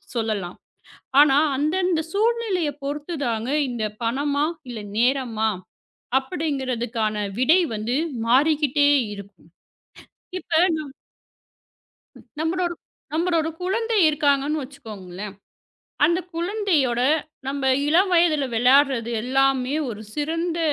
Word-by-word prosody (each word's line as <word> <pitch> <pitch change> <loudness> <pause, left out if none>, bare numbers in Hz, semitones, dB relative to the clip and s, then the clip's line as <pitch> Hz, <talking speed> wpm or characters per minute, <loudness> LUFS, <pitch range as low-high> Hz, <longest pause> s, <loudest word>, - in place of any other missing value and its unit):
சொல்லலாம். 215 -6 -2 0.6
ஆனா 280 -2 +6 0.2
அந்தந்த 340 +3 +1
சூழ்நிலையை 415 -7 0
பொறுத்துதாங்க 280 -6 -3 0.2
இந்தப் 215 -3 -4
பணமா? 285 +5 0 0.3
இல்ல 225 - -6 0.2
நேரமா? 240 -3 +1 0.7
அப்பிடிங்கறதுக்கான 255 -8 -2 0.2
விடை 310 +8 +5 0.2
வந்து 220 +4 -2 0.3
மாறிக்கிட்டே 285 +2 +3 0.2
இருக்கும். 200 -4 -13 0.9
இப்ப 325 -3 0 0.2
நம் 295 -3 -7 1.5
நம்மளோட- 345 +2 -1 0.4
நம்மளோட 330 -1 +1
குழந்தை 450 +4 0
இருக்காங்கன்னு 295 0 +1
வச்சுக்கோங்களேன். 210 -7 -9 0.7
அந்தக் 345 +3 +1
குழந்தையோட 340 - 0 0.5
நம்ம 280 0 -3 0.3
இளம் 365 +5 +4
வயதுல 320 -5 +3
விளையாடுறது 250 -1 +3
எல்லாமே 265 +1 +1
ஒரு 215 -2 -6
சிறந்த 330 +3 -2
285 Hz, 85 wpm, -23 LUFS, 240-330 Hz, 1.5 s, ஆனா